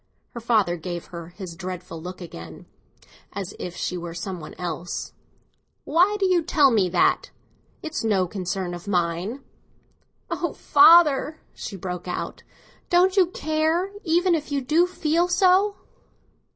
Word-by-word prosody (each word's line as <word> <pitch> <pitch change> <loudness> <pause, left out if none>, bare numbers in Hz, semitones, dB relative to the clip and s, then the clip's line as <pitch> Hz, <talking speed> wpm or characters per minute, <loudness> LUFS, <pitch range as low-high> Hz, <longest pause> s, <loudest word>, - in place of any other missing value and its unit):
Her 235 - -7
father 215 -7 +2
gave 175 +1 -6
her 170 -1 -7
his 175 -1 -9
dreadful 180 -2 -7
look 180 +2 -8
again, 85 - -10 0.7
as 200 -1 -5
if 175 -1 -6
she 180 - -3
were 170 -1 -7
some 180 +1 -5
one 155 - -10
else. 175 0 -5 0.7
"Why 360 +7 +3
do 390 - +2
you 365 -2 +3
tell 300 -4 +4
me 200 -5 +2
that? 175 0 +2 0.5
It's 315 -5 -4
no 200 -4 +2
concern 180 0 -4
of 175 +2 -9
mine." 180 +7 -1 0.9
"Oh, - - -2
father!" 320 -4 +5
she 200 - -7
broke 180 -2 -6
out, 180 - -4 0.5
"don't 365 +2 +4
you 375 -3 +5
care, 320 +2 0
even 350 +1 +2
if 305 -2 -2
you 285 - +1
do 310 +7 +2
feel 340 -1 +1
so?" 375 +3 +3
215 Hz, 145 wpm, -24 LUFS, -, 0.9 s, father